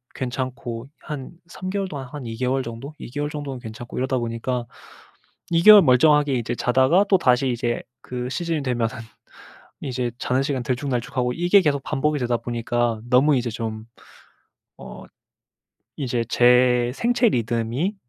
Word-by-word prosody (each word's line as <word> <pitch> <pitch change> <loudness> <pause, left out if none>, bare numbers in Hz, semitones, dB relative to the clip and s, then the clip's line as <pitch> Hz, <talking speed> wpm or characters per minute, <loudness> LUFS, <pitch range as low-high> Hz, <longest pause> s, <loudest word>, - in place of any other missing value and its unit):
괜찮고 125 -1 -4 0.2
한 145 -5 -6 0.2
3 185 +2 -7
개월 195 0 -2
동안 140 -4 -6
한 135 0 -8
2 115 -1 -6
개월 130 +2 0
정도 120 +6 -8
2 - - -8
개월 145 +2 -2
정도는 145 -3 -6
괜찮고 120 0 -9
이러다 130 +1 0
보니까 120 +1 -3 0.9
2 165 0 +3
개월 210 0 +10
멀쩡하게 145 +1 +4
이제 120 0 -2
자다가 130 +11 +3
또다시 135 -10 +3
이제 120 0 -2 0.2
그 125 0 -5
시즌이 165 +1 -2
되면은 120 -4 -1 0.9
이제 125 -2 -2
자는 130 +2 0
시간 135 -3 -2
들쭉날쭉하고 125 -1 -2
이게 175 +7 +4
계속 140 -5 0
반복이 150 +1 -1
되다 120 -2 0
보니까 120 -1 -2
너무 140 +4 +4
이제 120 -1 -1
좀 110 -1 -5 0.9
어 - - -10 0.9
이제 125 -4 -1
제 125 0 +4
생체 240 - +2
리듬이 120 - -1
125 Hz, 290 characters per minute, -23 LUFS, 120-145 Hz, 0.9 s, 개월